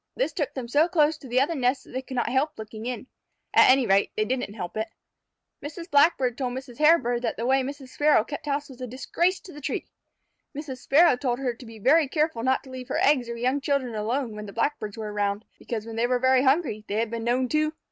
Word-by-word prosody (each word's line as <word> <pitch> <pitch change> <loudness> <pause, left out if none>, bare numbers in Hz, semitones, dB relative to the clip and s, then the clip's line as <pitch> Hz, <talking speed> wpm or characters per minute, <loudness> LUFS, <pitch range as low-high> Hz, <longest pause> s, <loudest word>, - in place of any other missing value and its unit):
This - - -1
took 305 -8 -3
them 255 -3 -4
so 290 +7 +3
close 315 -3 +3
to 270 - -11
the 250 +1 +2
other 290 +5 +2
nests 260 -2 0
that - - -16
they 260 - -3
could 260 0 -8
not 240 - 0
help 290 +4 0
looking 220 +1 -7
in. 250 -1 -4 0.5
At - - +7
any 260 0 +5
rate, 195 -1 +3
they 215 - +1
didn't 250 -4 -3
help 180 -5 -6
it. 220 +1 -2 0.8
Mrs. 325 +4 -8
Blackbird 285 -4 +3
told 250 -2 -2
Mrs. 260 -2 -8
Hairbird 300 -7 +4
that 245 - -2
the 230 - -3
way 265 +1 +3
Mrs. 270 0 -6
Sparrow 295 -4 +3
kept 290 +4 -7
house 285 0 -1
was 260 -3 -13
a 250 - -4
disgrace 340 - 0
to 360 - -12
the 295 - -10
tree. - - -3 0.7
Mrs. 280 -4 -6
Sparrow 305 +4 +5
told 245 -1 -1
her 255 -2 -2
to 240 +2 -13
be 225 0 -11
very 285 +8 +4
careful 305 -4 0
not 260 +2 +1
to 265 - -13
leave 255 -1 -7
her - - -2
eggs 260 -5 +3
or 235 - -4
young 255 +4 0
children 270 -4 -1
alone 225 +3 -2
when 210 0 -7
the 200 - -9
Blackbirds 230 -4 -2
were 215 -2 -5
around, 205 +1 -1
because 225 -3 -5
when 225 0 -7
they 235 +1 +2
were 250 0 +2
very 260 +1 +4
hungry 265 -5 +1
they 200 - -3
had 225 0 0
been 230 -1 -4
known 250 +2 +1
to 305 +2 +1
255 Hz, 250 wpm, -26 LUFS, 230-285 Hz, 0.8 s, At